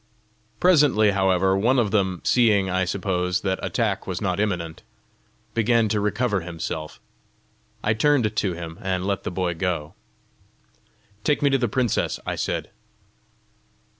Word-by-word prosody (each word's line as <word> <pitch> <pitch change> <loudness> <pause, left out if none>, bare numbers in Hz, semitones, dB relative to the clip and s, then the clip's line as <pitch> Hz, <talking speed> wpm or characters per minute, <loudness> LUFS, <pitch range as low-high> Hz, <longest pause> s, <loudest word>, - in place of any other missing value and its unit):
Presently, 145 - +4
however, 95 -1 +2
one 120 +7 +2
of 110 -5 +1
them, 95 -4 0
seeing, 105 -6 +3
I 95 0 +1
suppose, 90 -1 -1
that 95 -1 -1
attack - - -1
was - - -3
not - - -1
imminent, 85 -6 -2 0.7
began 115 0 +2
to 105 0 +1
recover 105 0 0
himself; 80 -2 -6 0.8
I 105 - +2
turned 115 -2 +2
to 95 -4 0
him, 85 -1 -8
and 95 -1 -2
let 100 -1 -1
the - - -4
boy 90 -1 -1
go. 85 -3 -3 1.3
"Take 145 -1 +1
me 140 - +4
to 135 - +4
the 120 -2 0
princess," 120 0 0
I - - -2
said. - - -3
100 Hz, 140 wpm, -24 LUFS, 90-110 Hz, 1.3 s, Presently